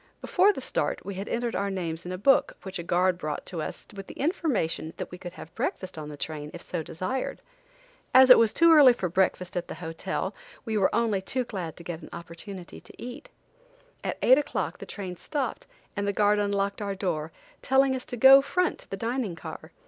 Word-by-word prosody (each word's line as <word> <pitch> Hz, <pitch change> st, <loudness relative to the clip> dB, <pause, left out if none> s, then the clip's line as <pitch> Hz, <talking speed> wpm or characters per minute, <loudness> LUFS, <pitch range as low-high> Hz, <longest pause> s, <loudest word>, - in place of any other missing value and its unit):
Before 380 Hz, +3 st, +4 dB
the -, -, -6 dB
start, -, -, -2 dB
we 200 Hz, -, -4 dB
had 195 Hz, +2 st, -5 dB
entered 235 Hz, 0 st, -1 dB
our 200 Hz, 0 st, 0 dB
names 175 Hz, -3 st, -4 dB
in -, -, -4 dB
a 185 Hz, -, -3 dB
book 270 Hz, +9 st, +3 dB
which 190 Hz, -1 st, -5 dB
a -, -, -4 dB
guard 180 Hz, +1 st, +2 dB
brought 150 Hz, -3 st, -4 dB
to 170 Hz, -4 st, -4 dB
us -, -, -6 dB
with 195 Hz, -1 st, -8 dB
the -, -, -10 dB
information 260 Hz, -, -1 dB
that -, -, -6 dB
we 180 Hz, -, -9 dB
could 175 Hz, -1 st, -8 dB
have 165 Hz, -3 st, -11 dB
breakfast 185 Hz, -1 st, -3 dB
on 155 Hz, -2 st, -6 dB
the 145 Hz, -, -8 dB
train 150 Hz, -1 st, -5 dB
if 170 Hz, -, -9 dB
so 175 Hz, -, -3 dB
desired. 185 Hz, +12 st, -3 dB, 0.7 s
As 260 Hz, 0 st, +8 dB
it -, -, +10 dB
was 225 Hz, -2 st, +4 dB
too 335 Hz, 0 st, +6 dB
early 280 Hz, -5 st, +8 dB
for 185 Hz, -6 st, -3 dB
breakfast 180 Hz, 0 st, 0 dB
at 175 Hz, -1 st, -2 dB
the -, -, -6 dB
hotel, 165 Hz, -2 st, -4 dB, 0.3 s
we 225 Hz, -2 st, -2 dB
were 195 Hz, -3 st, +4 dB
only 220 Hz, -5 st, +1 dB
too 255 Hz, +6 st, -1 dB
glad 185 Hz, -9 st, -6 dB
to 170 Hz, -, -10 dB
get 170 Hz, -1 st, -6 dB
an -, -, -11 dB
opportunity 175 Hz, +2 st, -9 dB
to -, -, -15 dB
eat. 250 Hz, -, -8 dB, 0.7 s
At -, -, -2 dB
eight 260 Hz, +3 st, +7 dB
o'clock 295 Hz, -, -3 dB
the -, -, -8 dB
train 185 Hz, -3 st, -6 dB
stopped 275 Hz, -, -3 dB, 0.3 s
and 200 Hz, -1 st, -1 dB
the 200 Hz, -, +1 dB
guard 210 Hz, +1 st, +3 dB
unlocked 200 Hz, 0 st, 0 dB
our 200 Hz, -1 st, -2 dB
door, 165 Hz, -5 st, -2 dB, 0.3 s
telling 265 Hz, 0 st, +3 dB
us 255 Hz, -, -6 dB
to 245 Hz, -, -5 dB
go 270 Hz, +3 st, +9 dB
front 360 Hz, +5 st, 0 dB
to -, -, -14 dB
the 195 Hz, -, -4 dB
dining 230 Hz, -3 st, -2 dB
car. -, -, -9 dB
195 Hz, 220 wpm, -27 LUFS, 175-245 Hz, 0.7 s, it